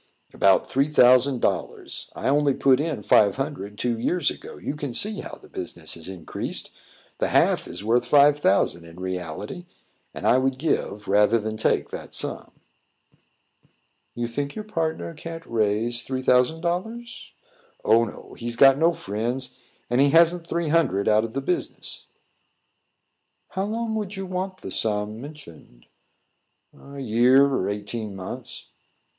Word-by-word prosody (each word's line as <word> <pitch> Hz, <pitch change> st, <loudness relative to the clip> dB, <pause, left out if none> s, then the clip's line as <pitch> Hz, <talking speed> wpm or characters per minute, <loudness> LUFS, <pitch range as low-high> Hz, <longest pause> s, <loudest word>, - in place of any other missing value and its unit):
"About 95 Hz, -1 st, +4 dB
three 135 Hz, +2 st, +1 dB
thousand 130 Hz, -2 st, +5 dB
dollars. -, -, -2 dB
I -, -, -3 dB
only 140 Hz, 0 st, +3 dB
put 135 Hz, -1 st, +4 dB
in 150 Hz, -8 st, -2 dB
five 100 Hz, -1 st, +5 dB
hundred, 135 Hz, -8 st, -5 dB
two 120 Hz, 0 st, -1 dB
years 175 Hz, +9 st, +1 dB
ago. -, -, -10 dB
You 145 Hz, -, -4 dB
can 145 Hz, -5 st, -5 dB
see 210 Hz, -, +1 dB
how -, -, -7 dB
the -, -, -17 dB
business 85 Hz, -2 st, -5 dB
has 85 Hz, 0 st, -9 dB
increased. 90 Hz, -4 st, -6 dB, 0.5 s
The -, -, +1 dB
half -, -, +2 dB
is -, -, -7 dB
worth 120 Hz, +3 st, +2 dB
five 145 Hz, +2 st, +5 dB
thousand 95 Hz, -8 st, +2 dB
in 85 Hz, +1 st, -13 dB
reality, 95 Hz, -, -5 dB, 0.4 s
and -, -, -7 dB
I 125 Hz, -, +5 dB
would 130 Hz, 0 st, 0 dB
give, 120 Hz, -8 st, -2 dB
rather 105 Hz, +3 st, +4 dB
than 110 Hz, 0 st, -3 dB
take 110 Hz, -, 0 dB
that -, -, -7 dB
sum." -, -, -3 dB, 1.7 s
"You 120 Hz, 0 st, -2 dB
think 140 Hz, +4 st, -4 dB
your 215 Hz, -, -5 dB
partner 165 Hz, -5 st, -3 dB
can't 165 Hz, +1 st, -8 dB
raise 115 Hz, +1 st, 0 dB
three 130 Hz, -1 st, -4 dB
thousand 125 Hz, +6 st, +3 dB
dollars?" 225 Hz, +8 st, -4 dB, 0.5 s
"Oh, 115 Hz, +1 st, +5 dB
no; 115 Hz, -, -8 dB
he's 120 Hz, 0 st, -4 dB
got 135 Hz, +1 st, +6 dB
no 165 Hz, +2 st, +4 dB
friends, 120 Hz, -, -4 dB, 0.3 s
and 120 Hz, +2 st, +2 dB
he 140 Hz, -, +5 dB
hasn't 170 Hz, +2 st, +4 dB
three 170 Hz, -2 st, -1 dB
hundred 150 Hz, -, +2 dB
out 110 Hz, 0 st, +4 dB
of 115 Hz, -, -8 dB
the 135 Hz, -, -2 dB
business." 175 Hz, +6 st, -3 dB, 1.4 s
"How 190 Hz, 0 st, -2 dB
long 225 Hz, +1 st, -2 dB
would 210 Hz, -2 st, -3 dB
you 195 Hz, 0 st, -5 dB
want 185 Hz, +1 st, -4 dB
the -, -, -7 dB
sum 105 Hz, 0 st, -2 dB
mentioned?" 85 Hz, -, -13 dB, 0.9 s
"A 140 Hz, 0 st, -13 dB
year 125 Hz, +3 st, +5 dB
or 135 Hz, -9 st, 0 dB
eighteen 105 Hz, 0 st, -4 dB
months." 95 Hz, -1 st, -8 dB
130 Hz, 155 wpm, -24 LUFS, 105-160 Hz, 1.7 s, got